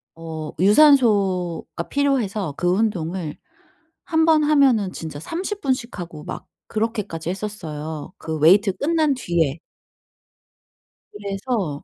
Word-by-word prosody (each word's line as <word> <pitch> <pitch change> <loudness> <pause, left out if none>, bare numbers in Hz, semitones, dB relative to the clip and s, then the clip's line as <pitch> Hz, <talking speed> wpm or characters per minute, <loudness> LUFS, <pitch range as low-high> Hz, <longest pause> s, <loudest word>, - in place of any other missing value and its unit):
어 160 -2 -6
유산소가 200 - +3
필요해서 220 - 0
그 175 - -1
운동을 180 -5 -1 0.7
한 320 -1 +2
번 315 -1 +5
하면은 265 -10 +3
진짜 155 -3 -7
30 380 - -4
분씩 250 -5 -2
하고 165 -3 -7
막 - - -7 0.2
그렇게까지 210 -7 -3
했었어요 160 -6 -5
그 160 -1 -4
웨이트 190 +5 +5
끝난 310 - +1
뒤에. 170 - 0 1.5
그래서 200 - -3
195 Hz, 230 characters per minute, -22 LUFS, 165-255 Hz, 1.5 s, 번